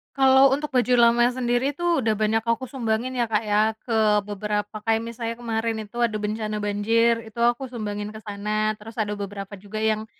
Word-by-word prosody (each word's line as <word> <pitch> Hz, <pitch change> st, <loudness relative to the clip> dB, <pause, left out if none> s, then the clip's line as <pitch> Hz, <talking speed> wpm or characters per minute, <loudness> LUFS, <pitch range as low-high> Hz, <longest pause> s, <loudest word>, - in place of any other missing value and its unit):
Kalau 265 Hz, 0 st, +6 dB
untuk 295 Hz, +2 st, -2 dB
baju 250 Hz, -1 st, +2 dB
lama 240 Hz, 0 st, +5 dB
sendiri 250 Hz, +2 st, 0 dB
tuh 345 Hz, +1 st, 0 dB
udah 225 Hz, -4 st, +1 dB
banyak 220 Hz, +2 st, 0 dB
aku 230 Hz, +2 st, -1 dB
sumbangin 250 Hz, 0 st, -2 dB
ya, 240 Hz, -, +2 dB
Kak, 220 Hz, -1 st, 0 dB
ya, 215 Hz, +2 st, +3 dB
ke 215 Hz, -3 st, +2 dB
beberapa, 210 Hz, +1 st, -3 dB
kayak 225 Hz, 0 st, +2 dB
misalnya 230 Hz, 0 st, -4 dB
kemarin 225 Hz, -1 st, -1 dB, 0.2 s
itu 240 Hz, -, -11 dB
ada 220 Hz, -, -3 dB
bencana 215 Hz, 0 st, -3 dB
banjir 225 Hz, +3 st, +2 dB
itu 220 Hz, +1 st, -10 dB
aku 240 Hz, +3 st, +2 dB
sumbangin 210 Hz, -3 st, -5 dB
ke 215 Hz, -, -9 dB
sana, 215 Hz, +1 st, -2 dB
terus 225 Hz, +2 st, -11 dB
ada 210 Hz, -1 st, -3 dB
beberapa 200 Hz, 0 st, -6 dB
juga 210 Hz, +2 st, -6 dB
yang 220 Hz, 0 st, 0 dB
220 Hz, 190 wpm, -24 LUFS, 210-240 Hz, 0.2 s, Kalau